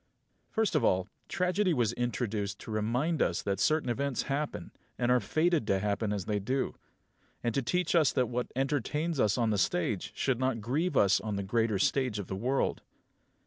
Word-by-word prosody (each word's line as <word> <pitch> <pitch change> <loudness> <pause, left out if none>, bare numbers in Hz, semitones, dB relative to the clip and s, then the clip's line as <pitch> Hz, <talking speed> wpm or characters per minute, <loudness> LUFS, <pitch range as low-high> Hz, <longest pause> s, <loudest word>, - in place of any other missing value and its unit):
6. - - -35
First 220 -1 +2
of - - +3
all, 95 0 +2 0.2
tragedy 180 0 +1
was 120 -3 +1
introduced 110 -5 -2
to - - -8
remind 125 +10 0
us 85 - +1
that 100 -1 -1
certain 155 -3 +2
events 135 +2 -1
happen, 140 - -3 0.3
and 120 0 +1
are 125 - +5
fated 155 -3 +1
to 95 - +3
happen 105 +2 -1
as 100 -3 -2
they 105 -1 0
do; 130 +7 -1 0.7
and 120 - 0
to 135 - +1
teach 180 +7 0
us 160 -5 +4
that 130 -2 +2
what 125 +1 -3
entertains 145 +4 -1
us 105 -1 +3
on 115 -2 +2
the 105 - +1
stage 90 +1 0
should 130 -3 0
not 130 -3 0
grieve 145 +11 -1
us 100 0 +4
on 105 -2 -3
the 100 - -2
greater 110 +1 +1
stage 125 +3 +1
of 100 - -4
the 95 - -5
world. 125 +7 0
120 Hz, 195 wpm, -30 LUFS, 105-140 Hz, 0.7 s, are